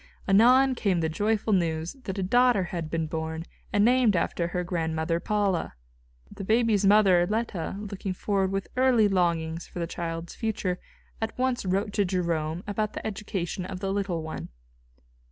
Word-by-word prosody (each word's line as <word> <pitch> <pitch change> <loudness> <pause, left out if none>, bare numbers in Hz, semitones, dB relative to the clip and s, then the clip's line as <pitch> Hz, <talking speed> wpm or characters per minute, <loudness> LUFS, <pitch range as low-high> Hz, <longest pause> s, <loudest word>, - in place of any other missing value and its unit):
Anon 250 +7 +6
came 200 -7 0
the 160 -1 0
joyful 210 +5 0
news 165 -2 0
that 190 0 -4
a 195 - -1
daughter 245 +1 +4
had 170 -3 -4
been 165 0 -1
born 160 +1 -4 0.3
and 205 0 +3
named 245 -4 +4
after 170 0 0
her 180 +1 -2
grandmother, 165 -1 -1
Paula. 195 - 0 0.6
The - - -6
baby's 220 -1 +2
mother, 195 -3 +5
Leta, 215 -6 -2
looking 200 -2 -5
forward 195 0 0
with 195 0 -2
early 250 -4 +4
longings 170 -3 0
for - - -11
the 170 - -1
child's 165 0 -5
future, 200 -5 -2 0.4
at 225 0 -3
once 255 -3 0
wrote 200 +3 0
to 205 - +2
Jerome 170 -2 -1
about 215 +1 -2
the - - -6
education 195 -4 -3
of 185 0 -6
the 195 0 -2
little 195 -5 -2
one. 160 - -6
190 Hz, 165 wpm, -27 LUFS, 170-210 Hz, 0.6 s, Anon